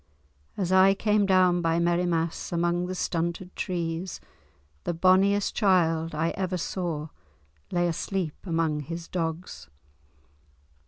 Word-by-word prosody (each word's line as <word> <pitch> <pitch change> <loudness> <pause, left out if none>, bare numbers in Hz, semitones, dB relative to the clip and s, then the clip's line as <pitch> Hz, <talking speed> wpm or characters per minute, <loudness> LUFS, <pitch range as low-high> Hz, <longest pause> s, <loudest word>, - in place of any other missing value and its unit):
As 185 -3 -1
I 190 +1 +6
came 210 0 +2
down 185 -2 +4
by 165 0 +1
Merrimass 170 -1 0
among 175 +1 0
the 185 - -4
stunted 170 +1 -2
trees, 175 -1 -3 0.6
the 175 - -2
bonniest 190 +3 +3
child 165 -6 +2
I 160 +2 0
ever 185 -1 -2
saw 165 -3 -3 0.6
lay 175 0 +1
asleep 170 -1 -2
among 165 -3 0
his 165 +3 -6
dogs. 160 - -4
175 Hz, 115 wpm, -27 LUFS, 165-185 Hz, 0.6 s, I